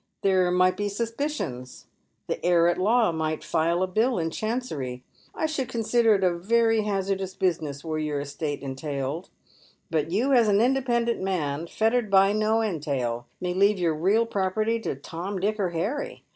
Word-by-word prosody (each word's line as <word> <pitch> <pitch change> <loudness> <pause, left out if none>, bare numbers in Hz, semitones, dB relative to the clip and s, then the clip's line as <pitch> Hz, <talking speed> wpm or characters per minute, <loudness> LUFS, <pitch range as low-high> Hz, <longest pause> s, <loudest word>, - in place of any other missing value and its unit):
There 185 -2 +3
might 185 +1 +3
be 205 0 -1
sus 225 +3 -3
picions. 230 - -4 0.4
The - - -4
heir 170 -1 +4
at 175 - +1
law 220 +1 +3
might 155 -1 -2
file 170 +3 +1
a - - 0
bill 225 +6 +1
in 165 -1 -1
Chancery. 160 - -3 0.3
I - - -1
should 290 -5 -2
consider 225 -1 +3
it 195 - -1
a 180 -1 +3
very 225 +5 +2
hazardous 195 -2 -2
business 155 -7 -1
were 155 -1 -2
your 150 -2 -2
estate 145 +1 -4
entailed; 140 +3 -4 0.6
but 155 -1 0
you 235 +10 +1
as 235 -4 +5
an 205 -1 +4
independent 240 -1 +1
man, 165 -5 -2
fettered 225 +3 +1
by 195 +1 +5
no 215 +1 +2
entail, 135 - -2
may 180 0 -2
leave 200 +2 +3
your 170 -3 +1
real 200 +9 +2
property 215 +2 0
to 225 - -3
Tom, 175 +8 -5
Dick, 210 +3 -1
or 190 -3 +1
Harry. 255 - -3
190 Hz, 170 wpm, -26 LUFS, 160-225 Hz, 0.6 s, as